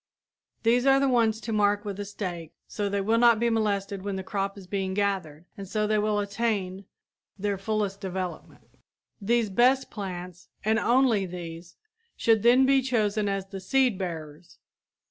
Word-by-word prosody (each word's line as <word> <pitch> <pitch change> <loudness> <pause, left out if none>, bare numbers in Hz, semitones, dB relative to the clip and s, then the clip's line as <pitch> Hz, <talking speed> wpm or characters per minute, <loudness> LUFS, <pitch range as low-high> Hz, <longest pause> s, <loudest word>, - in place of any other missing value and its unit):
These 245 +3 +3
are 270 0 +6
the 275 - +2
ones 230 -4 +2
to 225 - -4
mark 205 0 +2
with 200 -1 -5
a 205 - -3
stake 180 -5 -6
so 205 -1 -3
they 200 0 -1
will 225 +4 +2
not 235 -2 +5
be 235 0 +1
molested 200 -3 -1
when 200 0 -3
the 190 - -4
crop 195 +1 -3
is 195 - -10
being 190 0 -3
gathered 185 -6 -2
and 200 -1 -8
so 215 0 0
they 215 0 +1
will 210 0 +1
attain 200 -2 -2 0.5
their 205 0 -1
fullest 205 -1 -2
development. 185 -2 -6 0.4
These 225 0 +1
best 255 +6 +3
plants, 180 -4 -7 0.2
and 220 +1 +3
only 235 -5 +3
these, 170 -1 -8 0.4
should 225 -2 +3
then 245 +4 +5
be 270 0 +4
chosen 215 -5 0
as 195 -1 -2
the 195 - -6
seed 245 +1 +1
bearers. 165 -2 -7
205 Hz, 170 wpm, -27 LUFS, 190-225 Hz, 0.5 s, are